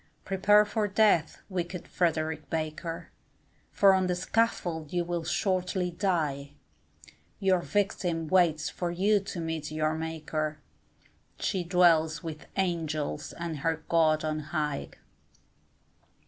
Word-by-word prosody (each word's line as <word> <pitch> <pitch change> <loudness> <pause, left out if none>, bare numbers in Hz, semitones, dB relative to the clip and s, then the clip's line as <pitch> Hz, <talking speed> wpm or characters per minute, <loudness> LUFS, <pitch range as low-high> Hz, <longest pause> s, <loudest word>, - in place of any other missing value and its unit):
Prepare 205 +2 +4
for 210 0 -1
death, 200 -6 +2
wicked 180 -2 -4
Frederick 160 -3 -1
Baker, 165 +2 -4 0.6
For 195 -1 +5
on 190 -1 +2
the 180 - 0
scaffold 175 -5 -1
you 175 -1 0
will 170 -1 -3
shortly 180 +1 0
die, 155 -7 -1 0.9
Your 190 -2 +3
victim 175 -5 -1
waits 165 -4 +3
for 175 - -3
you 200 +4 +3
to 195 -2 -6
meet 160 -2 -3
your 155 0 0
Maker, 155 -1 -3 0.8
She 190 -3 -1
dwells 170 -2 +3
with 155 -2 -7
Angels 165 -6 -2
and 170 -3 -5
her 160 +2 -1
God 155 -2 +3
on 155 0 -1
high. 150 - -3
170 Hz, 120 wpm, -29 LUFS, 155-185 Hz, 0.9 s, For